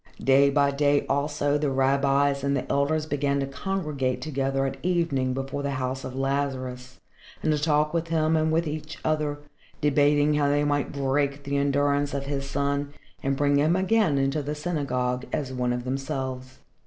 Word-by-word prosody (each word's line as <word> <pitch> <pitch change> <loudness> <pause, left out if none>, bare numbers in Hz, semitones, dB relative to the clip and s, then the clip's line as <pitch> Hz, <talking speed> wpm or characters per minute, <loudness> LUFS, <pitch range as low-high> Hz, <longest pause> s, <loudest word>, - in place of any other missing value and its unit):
Day 135 +1 +5
by 140 0 +3
day, 145 0 +2
also, 145 +1 0
the 145 -1 0
rabbis 140 +1 +2
and 140 0 +1
the - - -3
elders 150 +2 +1
began 145 -2 0
to 135 - 0
congregate 140 -3 -2
together 135 -2 -1
at 135 0 -3
evening 165 -8 0
before 135 +1 -3
the 140 0 -2
house 130 +1 -3
of 130 0 -6
Lazarus 130 -2 -3 0.4
and 155 - +2
to 150 - 0
talk 150 0 +1
with 165 0 -1
him 160 -1 +1
and 155 0 +2
with 165 +2 +1
each 155 +1 -5
other, 150 -2 0 0.4
debating 145 0 +3
how 145 -1 +2
they 145 +1 +2
might 145 -1 0
break 140 0 -1
the 140 0 -3
endurance 140 0 +1
of 140 0 -3
his 140 -1 -3
son 140 0 -1 0.3
and 135 0 -1
bring 145 0 +3
him 155 +4 +3
again 190 -5 +2
into 135 +2 +1
the 145 +1 -4
synagogue 130 -6 -2
as 140 -4 -2
one 125 -1 0
of 125 0 -2
themselves. 130 0 -4
140 Hz, 180 wpm, -26 LUFS, 135-150 Hz, 0.4 s, Day